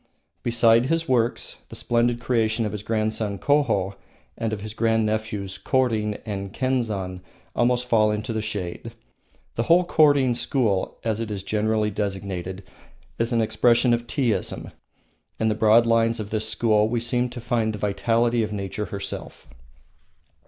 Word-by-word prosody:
Beside 115 0 +4
his 165 +2 0
works, 120 -3 0
the - - -9
splendid 120 0 +1
creation 115 -2 +1
of 105 - -2
his 105 - -5
grandson, 110 -2 -1
Koho, 115 -10 +1 0.4
and 115 -1 -2
of 105 -2 -4
his 110 0 -7
grand 115 0 +1
nephews, 105 -2 -3
Korin 110 -6 0
and 100 -2 -4
Kenzan, 110 -9 -2 0.3
almost 120 +1 +2
fall 110 -3 +4
into 105 +2 -2
the 110 - -1
shade. 105 +1 -5 0.6
The - - -1
whole 175 +2 +6
Korin 145 -6 +4
school, 115 -6 0
as 110 -1 -1
it 115 -1 -3
is 100 -2 -4
generally 110 +1 0
designated, 95 -2 -4 0.6
is 115 +1 0
an 115 -1 +2
expression 120 +2 +3
of 120 0 -1
Teaism. 125 -6 -1 0.7
In 110 - +2
the - - +2
broad 110 +2 +5
lines 115 0 +2
of 105 -1 -6
this 110 0 -1
school 110 -2 +2
we 120 0 0
seem 120 +1 0
to 120 0 -8
find 115 -2 0
the 105 - -5
vitality 115 +4 +1
of 110 -1 -2
nature 105 +1 -4
herself. 100 -2 -6
110 Hz, 155 wpm, -24 LUFS, 105-120 Hz, 0.7 s, whole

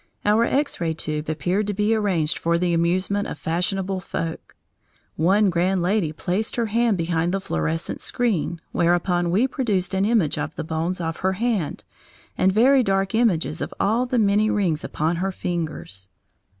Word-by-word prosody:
Our 215 +3 +4
X 280 -6 0
ray 165 -1 0
tube 155 -1 -4
appeared 180 +7 -1
to 205 - -2
be 210 +2 +2
arranged 185 -8 0
for 170 0 +1
the 175 0 0
amusement 185 +4 +1
of - - -6
fashionable 185 +5 -1
folk. 165 -3 -5 0.6
One 195 +5 +3
grand 180 +1 +1
lady 180 -3 +1
placed 180 +7 -2
her 235 - 0
hand 225 -1 +1
behind 170 0 0
the 195 - 0
fluorescent 80 - -3
screen, 195 -8 -1
whereupon 175 0 +1
we 200 +9 +3
produced 205 -9 -1
an 190 +1 +2
image 205 -10 +1
of 150 +1 -4
the - - -4
bones 165 +3 -2
of 165 -1 -3
her 190 0 0
hand 210 -6 -1 0.5
and 190 - +3
very 255 +7 +5
dark 195 -3 0
images 190 -8 +1
of - - -4
all 230 +5 +1
the 245 - 0
many 210 0 +3
rings 175 -9 0
upon 160 +3 -1
her 190 +3 -1
fingers. 160 - -4
185 Hz, 170 wpm, -23 LUFS, 165-210 Hz, 0.6 s, very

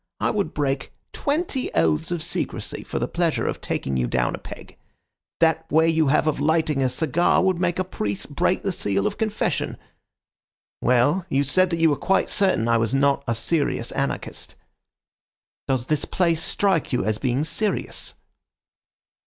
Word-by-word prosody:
I - - +1
would 205 -2 -2
break 135 -2 -1 0.2
twenty 290 -3 -1
oaths 80 -2 +2
of 175 -3 -2
secrecy 170 - -3
for - - -5
the - - -1
pleasure - - 0
of - - -3
taking 65 -1 -2
you 60 -1 0
down - - 0
a - - -5
peg. - - -11 0.6
That 160 0 +2
way 160 +2 +4
you 160 -2 +2
have 150 +2 +3
of 155 -2 0
lighting 155 -1 +1
a 130 - +2
cigar 160 +8 +2
would 185 -2 +1
make 175 -1 0
a 185 - +1
priest 105 - -4
break - - +1
the - - 0
seal 100 -1 -1
of - - -2
confession. 215 -1 -1 1.0
Well, 145 +9 +2
you 140 -2 +2
said 185 +7 +3
that 170 - -1
you 165 -1 +4
were - - +2
quite 195 - +1
certain 190 - +2
I 115 0 +4
was 115 +3 0
not 140 0 +2
a 115 - +1
serious 140 0 -1
anarchist. 140 0 -3 1.1
Does 130 -3 0
this 150 +2 0
place 170 -3 +1
strike 190 -5 +1
you 125 -7 0
as 110 0 0
being 130 +4 0
serious?" 205 +7 -2
150 Hz, 170 wpm, -23 LUFS, 125-175 Hz, 1.1 s, way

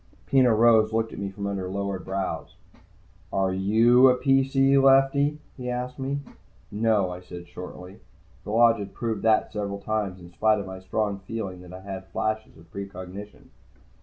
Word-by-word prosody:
Peno 130 -2 +4
Rose 110 -1 +5
looked 110 0 -1
at - - -7
me 100 -1 -3
from 100 +1 -6
under 95 -2 -3
lowered 100 -1 -3
brows. 95 0 -4 0.8
"Are 95 -1 +1
you 115 +7 +5
a 125 - +3
PC, 135 0 +3
Lefty?" 135 +2 +4 0.2
he 125 -1 -5
asked 125 +1 -4
me. 140 +2 -2 0.5
"No," 105 -3 +1
I 90 - -6
said 90 -1 -10
shortly. 90 +1 -10 0.4
The - - -9
Lodge 115 +1 +4
had 100 - -7
proved 110 -4 -2
that 110 -1 +2
several 100 -1 -3
times, 100 -3 -2
in 85 -1 -13
spite 110 +4 +3
of 100 - -4
my 95 0 -8
strong 100 +2 -2
feelings 95 -2 -6
that 90 -1 -12
I 95 +1 -9
had 95 -1 -7
flashes 110 +2 -3
of 80 0 -18
precognition. 100 +1 -9
105 Hz, 170 wpm, -25 LUFS, 95-120 Hz, 0.8 s, Rose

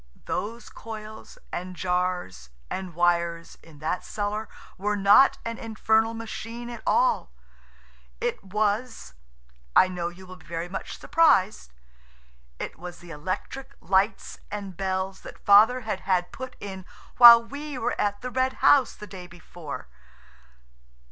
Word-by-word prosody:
Those 230 +3 -4
coils 220 -1 -10
and 185 +1 -5
jars 180 - -2 0.2
and 185 -3 -5
wires 170 -1 0
in 160 -3 -16
that 180 - -1
cellar 210 +1 -3 0.3
were 210 +2 -1
not 205 +7 +6
an 230 0 -4
infernal 220 0 +1
machine 230 +1 -7
at 235 -2 -8
all. 255 - +2 0.9
It - - -2
was–I 65 - -1
know 175 -2 -3
you 180 +2 -13
will 185 0 -11
be 160 - -20
very 170 0 -4
much 190 +2 -6
surprised–it 60 - -1
was 175 0 -8
the 175 -1 -13
electric 185 - -5
lights 195 +4 0
and 200 -3 -6
bells 190 +1 -3
that - - -12
Father 220 +5 +6
had 215 -4 -3
had 185 -2 0
put 260 -1 -8
in 190 -2 -7 0.3
while 235 -1 +11
we 285 +3 -7
were 230 - -1
at 205 0 -1
the 250 - -4
Red 260 0 +1
House 275 -4 +4
the 210 - -9
day 185 -3 -10
before. 170 - -9
190 Hz, 135 wpm, -26 LUFS, 170-225 Hz, 0.9 s, while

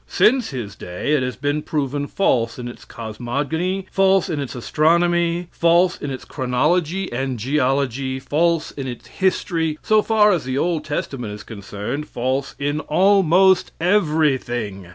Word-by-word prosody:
Since 255 0 +3
his 120 -7 -5
day 90 +11 -3
it 150 - +3
has 125 -1 -2
been 145 +1 -1
proven 145 -2 -2
false 120 -10 +1
in 125 -1 -6
its 120 - -10
cosmogony, 145 - -3
false 195 -1 +3
in 155 - -2
its 140 -3 -5
astronomy, 170 +5 +1
false 170 +1 +3
in 145 - -3
its 130 -1 -6
chronology 155 +7 0
and 130 +1 -2
geology, 130 +1 0
false 165 +4 0
in 135 -2 -6
its 120 -2 -7
history, 165 -4 -1
so 215 0 +4
far 210 -1 +4
as 175 -5 0
the 130 +1 -3
Old 165 +1 0
Testament 135 -6 -4
is 105 - -9
concerned, 105 +7 -6
false 130 +3 -2
in 145 +1 -1
almost 190 +2 +3
everything. 140 - 0
150 Hz, 150 wpm, -21 LUFS, 130-175 Hz, -, so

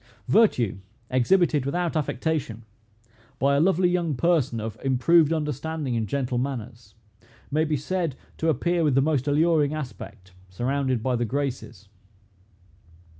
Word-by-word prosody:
Virtue, 125 - +3 0.3
exhibited 150 +3 +3
without 170 +5 -2
affectation, 140 -6 -2 0.7
by 140 +2 +2
a - - +3
lovely 180 +2 +3
young 175 -4 0
person, 145 -6 +1
of 110 0 -5
improved 145 +5 +3
understanding 150 -3 -2
and 110 -2 -1
gentle 125 +1 -1
manners, 120 -4 -6 0.6
may 155 +2 +2
be 155 -1 0
said 165 -1 -2 0.2
to 165 - 0
appear 170 +4 +1
with 145 -4 +2
the - - +5
most 145 -2 0
alluring 155 0 +2
aspect, 110 -9 -8 0.2
surrounded 130 +4 -1
by 130 0 +1
the 120 - 0
Graces. 125 -6 -4
140 Hz, 130 wpm, -25 LUFS, 125-160 Hz, 0.7 s, the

